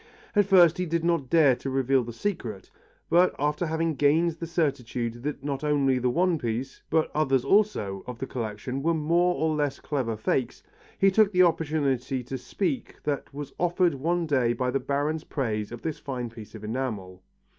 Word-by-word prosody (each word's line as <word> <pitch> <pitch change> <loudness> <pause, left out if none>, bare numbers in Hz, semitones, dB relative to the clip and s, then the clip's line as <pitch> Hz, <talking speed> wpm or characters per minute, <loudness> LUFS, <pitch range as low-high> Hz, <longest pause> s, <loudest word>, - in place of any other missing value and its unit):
At 205 -2 +4
first 180 -3 +6
he 180 - -1
did 165 0 -1
not 170 -7 +1
dare 150 -5 +5
to 135 - -5
reveal 135 -1 +2
the 120 - -6
secret, 115 - -4 0.4
but 175 +2 +4
after 150 +4 0
having 160 +1 0
gained 155 +4 +3
the 165 +1 -7
certitude 125 -7 -2
that 140 0 -4
not 140 0 -3
only 140 -3 +2
the 125 0 +1
one 175 +4 +2
piece, 120 +3 -4
but 160 -1 +1
others 135 -4 +1
also, 195 - +2
of 125 -1 -6
the 135 - -4
collection 125 +2 -4
were 165 +3 +1
more 170 +3 +2
or 160 0 0
less 145 -2 -1
clever 125 -7 -2
fakes, 120 +3 -1 0.3
he 195 0 +4
took 210 +1 +4
the 185 -1 +5
opportunity 140 -6 0
to 130 +2 -5
speak 200 - -3
that 145 -2 -2
was 145 0 -7
offered 175 -1 +2
one 170 +5 0
day 130 -6 +2
by 125 +1 -1
the 135 - 0
Baron's 145 +4 -1
praise 110 -7 -2
of 120 - -8
this 160 -2 -3
fine 125 -4 -5
piece 115 -2 -11
of 110 - -10
enamel. 105 -6 -4
140 Hz, 190 wpm, -26 LUFS, 125-165 Hz, 0.4 s, first